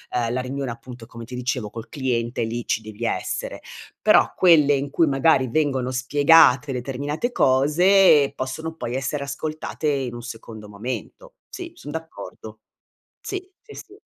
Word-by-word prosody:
uhm, 120 Hz, -1 st, 0 dB
la 130 Hz, -, -1 dB
riunione, 135 Hz, 0 st, -4 dB
appunto, 120 Hz, 0 st, -10 dB
come 115 Hz, 0 st, -10 dB
ti 125 Hz, +2 st, -8 dB
dicevo 125 Hz, -3 st, -2 dB
col 115 Hz, 0 st, -8 dB
cliente 120 Hz, -4 st, -2 dB
e -, -, +1 dB
lì 120 Hz, +1 st, -4 dB
ci 110 Hz, -, 0 dB
devi 110 Hz, +1 st, -7 dB
essere, -, -, -3 dB, 0.4 s
però -, -, +4 dB
quelle 155 Hz, -5 st, +5 dB
in 140 Hz, 0 st, -1 dB
cui 165 Hz, -, +3 dB
magari 135 Hz, -1 st, +3 dB
vengono 135 Hz, -2 st, 0 dB
spiegate 145 Hz, +1 st, +5 dB
determinate 140 Hz, -, -3 dB
cose, 150 Hz, -, +4 dB
possono 150 Hz, +5 st, -4 dB
poi 120 Hz, -6 st, -4 dB
essere 135 Hz, +2 st, -2 dB
ascoltate 155 Hz, +2 st, -4 dB
in 135 Hz, -4 st, -1 dB
un 120 Hz, -, -7 dB
secondo 115 Hz, -2 st, -9 dB
momento. 125 Hz, -, -7 dB, 0.2 s
Sì 345 Hz, -2 st, -7 dB
son 145 Hz, -, -9 dB
d'accordo, 160 Hz, +1 st, -9 dB, 0.6 s
sì, 375 Hz, -1 st, -6 dB
sì, 435 Hz, -, -13 dB
sì. 400 Hz, +1 st, -12 dB
135 Hz, 155 wpm, -23 LUFS, 120-155 Hz, 0.6 s, quelle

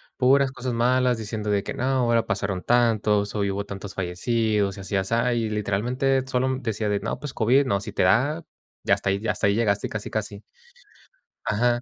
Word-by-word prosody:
Puras 135 Hz, +1 st, +4 dB
cosas 125 Hz, -1 st, -4 dB
malas, 125 Hz, +1 st, +2 dB
diciendo 105 Hz, -1 st, -4 dB
de 100 Hz, -1 st, +2 dB
que: 100 Hz, -, -5 dB
"No, -, -, -4 dB
ahora 120 Hz, -3 st, +2 dB
pasaron 100 Hz, -4 st, -2 dB
tantos, 110 Hz, -4 st, +2 dB
o -, -, -1 dB
hubo 100 Hz, 0 st, -1 dB
tantos 100 Hz, 0 st, -7 dB
fallecidos", 100 Hz, +2 st, 0 dB
y -, -, -8 dB
así 100 Hz, +1 st, -4 dB
y -, -, +4 dB
asá, 115 Hz, +6 st, +1 dB
y 115 Hz, -2 st, -1 dB
literalmente, 120 Hz, +6 st, 0 dB
sólo 130 Hz, 0 st, 0 dB
decía: 110 Hz, -3 st, -2 dB
"De 100 Hz, -1 st, 0 dB
no, 115 Hz, -, -3 dB
pues 145 Hz, -2 st, -6 dB
COVID, 130 Hz, +5 st, +3 dB
no, 100 Hz, -4 st, 0 dB
si -, -, -6 dB
te -, -, 0 dB
da" 135 Hz, -, +2 dB, 0.4 s
y -, -, 0 dB
hasta -, -, +2 dB
ahí 100 Hz, -, +1 dB
y 115 Hz, -, -4 dB
hasta -, -, +1 dB
ahí 100 Hz, -, +2 dB
llegaste 105 Hz, -3 st, +1 dB
casi, 110 Hz, -1 st, -5 dB
casi. 105 Hz, -1 st, -4 dB, 1.0 s
Ajá, 120 Hz, +3 st, +1 dB
110 Hz, 205 wpm, -24 LUFS, 100-125 Hz, 1.0 s, Puras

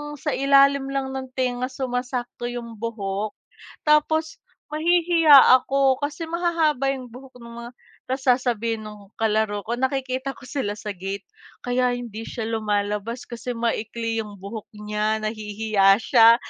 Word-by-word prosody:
sa 295 Hz, +1 st, -3 dB
ilalim 275 Hz, 0 st, +4 dB
lang 270 Hz, -1 st, -2 dB
ng 265 Hz, 0 st, -5 dB
tenga 250 Hz, -1 st, -1 dB
sumasakto 250 Hz, -2 st, -3 dB
yung 235 Hz, -2 st, -6 dB
buhok. 210 Hz, -2 st, -3 dB, 0.5 s
Tapos 315 Hz, +1 st, +2 dB, 0.4 s
mahihiya 335 Hz, -1 st, +4 dB, 0.3 s
ako 270 Hz, -1 st, +2 dB
kasi 295 Hz, +3 st, -3 dB
mahahaba 325 Hz, -5 st, +1 dB
yung 255 Hz, -2 st, -8 dB
buhok 255 Hz, +1 st, -13 dB
nung 235 Hz, 0 st, -11 dB
mga 240 Hz, -, -8 dB, 0.4 s
tas 265 Hz, 0 st, -2 dB
sasabihin 235 Hz, -3 st, +1 dB
ng 210 Hz, -1 st, -12 dB
kalaro 215 Hz, -2 st, +1 dB
ko 235 Hz, +4 st, -3 dB
nakikita 260 Hz, 0 st, -1 dB
ko -, -, -18 dB
sila 205 Hz, -8 st, -2 dB
sa 210 Hz, 0 st, -5 dB
gate, 195 Hz, +2 st, -5 dB, 0.4 s
"Kaya 250 Hz, 0 st, +1 dB
hindi 225 Hz, -2 st, -6 dB
siya 225 Hz, -3 st, -4 dB
lumalabas 210 Hz, +1 st, -2 dB
kasi 240 Hz, +1 st, -5 dB
maikli 230 Hz, 0 st, -2 dB
yung 210 Hz, -2 st, -8 dB
buhok 210 Hz, +2 st, -7 dB
niya. 210 Hz, +1 st, -1 dB
Nahihiya 215 Hz, -2 st, +2 dB
siya." 230 Hz, -1 st, +7 dB
245 Hz, 140 wpm, -23 LUFS, 215-270 Hz, 0.5 s, siya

